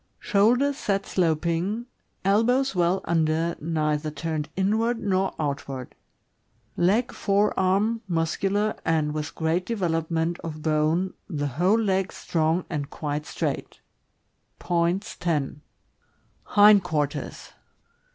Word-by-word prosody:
— - - -45
Shoulders 245 +7 +3
set 195 -1 -1
sloping; 170 +6 0 0.4
elbows 245 +7 +3
well 180 +1 +1
under, 165 0 +1
neither 155 -1 -1
turned 155 -1 -3
inward 220 +5 +1
nor 195 -3 0
outward. 140 -3 -4 0.8
Leg 200 +8 +2
— - - -15
fore 200 +1 +1
arm 200 +5 +1
muscular 195 +5 0
and 155 -2 +1
with 150 -1 -4
great 165 +2 0
development 165 -5 -1
of 155 -2 -7
bone, 155 +4 +1 0.2
the 145 -5 -2
whole 180 - +2
leg 195 -3 0
strong 165 +1 0
and 145 -4 -4
quite 150 -1 -4
straight - - -3 0.8
Points, 175 +4 0
10. 150 -4 -1 0.8
Hind 205 -1 +6
quarters. 150 -4 -3
170 Hz, 110 wpm, -25 LUFS, 155-200 Hz, 0.8 s, Hind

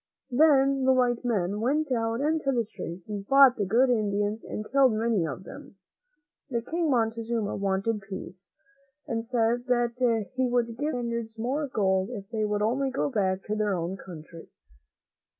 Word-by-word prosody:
Then 275 -1 +4
the 265 - +5
white 245 -2 +1
men 205 -4 0
went 285 +4 0
out 230 0 0
into 305 -1 +1
the 235 -3 0
streets 175 -3 -8
and 205 -2 -5
fought 275 -2 +7
the 205 -3 -1
good 250 +6 +3
Indians 205 -1 0
and 215 - -6
killed 270 -3 +4
many 215 -6 +1
of 160 +5 -6
them. 195 - -11 0.7
The 235 -3 -2
kind - - -16
King 335 -1 0
Montezuma 230 -3 0
wanted 200 +2 -1
peace, 190 -2 -9 0.6
and 225 -1 -2
said 240 +1 0
that 240 -2 +1
he 260 0 +1
would 240 -2 0
give 300 +3 -1
the 245 - -2
Spaniards 235 -1 -4
more 270 +6 -1
gold 190 -5 +1
if 205 -6 -7
they 220 -2 0
would 210 0 -1
only 265 +5 +1
go 270 +2 -1
back 195 -4 0
to 210 - -3
their 210 -2 0
own 175 +2 -3
country. 165 -3 -11
230 Hz, 175 wpm, -27 LUFS, 205-255 Hz, 0.7 s, fought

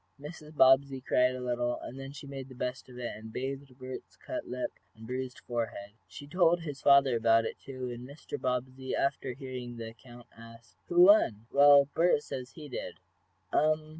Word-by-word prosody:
Mrs. 150 +1 -10
Bobbsey 135 +1 +5
cried 125 0 +2
a - - -5
little, 120 -1 -1
and 130 - -8
then 135 0 -7
she 145 +1 -10
made 135 -1 -7
the 130 - -11
best 125 +1 -4
of 125 - -12
it, 120 -1 -4
and 110 +1 -10
bathed 135 +1 -5
Bert's 130 -1 -8
cut 315 -1 -6
lip 125 0 -3 0.2
and 110 0 -12
bruised 125 +1 -4
forehead. 115 -4 -4 0.2
She 145 - -10
told 175 +2 +3
his 145 -4 -6
father 140 -3 +6
about 115 0 +4
it, - - -5
too, 130 -2 -6
and 120 +1 -8
Mr. 145 +2 -8
Bobbsey, 130 +1 -2
after 135 -2 -1
hearing 125 -3 -7
the 115 -1 -6
account, 120 +1 -14
asked: 115 0 -15
"Who 175 0 +4
won?" 180 - +6
"Well, 140 0 +7
Bert 165 -3 +3
says 130 0 -7
he 155 -3 -9
did?" 135 - -6 0.6
"Um. 155 0 +2
130 Hz, 190 wpm, -30 LUFS, 120-140 Hz, 0.6 s, Well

